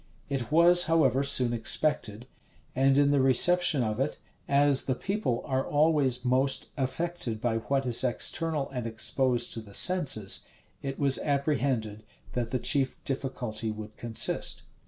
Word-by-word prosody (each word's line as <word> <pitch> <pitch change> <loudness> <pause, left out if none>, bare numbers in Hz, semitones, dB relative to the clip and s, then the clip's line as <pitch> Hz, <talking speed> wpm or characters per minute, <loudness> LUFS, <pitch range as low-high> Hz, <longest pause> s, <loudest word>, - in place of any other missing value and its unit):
[*] - - -32
It 135 -1 -4
was, 175 +2 +5
however, 160 -4 +2
soon 135 -4 +1
expected; 115 -2 -2 0.5
and 135 +1 +3
in 145 0 +3
the 140 -2 +2
reception 150 +3 +3
of 110 0 -3
it, 135 +3 -2 0.3
as 140 -1 +4
the 130 - -1
people 195 - -2
are 130 -1 -1
always 145 -5 +1
most 130 +2 0
affected 135 -3 -4
by 115 -1 -1
what 135 +4 -2
is 120 0 +2
external 150 +3 -2
and 125 -3 -4
exposed 120 +2 -1
to 115 - -6
the 100 -2 -8
senses, 135 - +3 0.4
it 135 -1 -5
was 140 -2 +3
apprehended 135 -7 -1 0.3
that 120 -2 -3
the 130 - -1
chief 135 0 0
difficulty 125 -5 -4
would 110 0 -8
consist. 115 -2 0
135 Hz, 150 wpm, -28 LUFS, 120-145 Hz, 0.5 s, was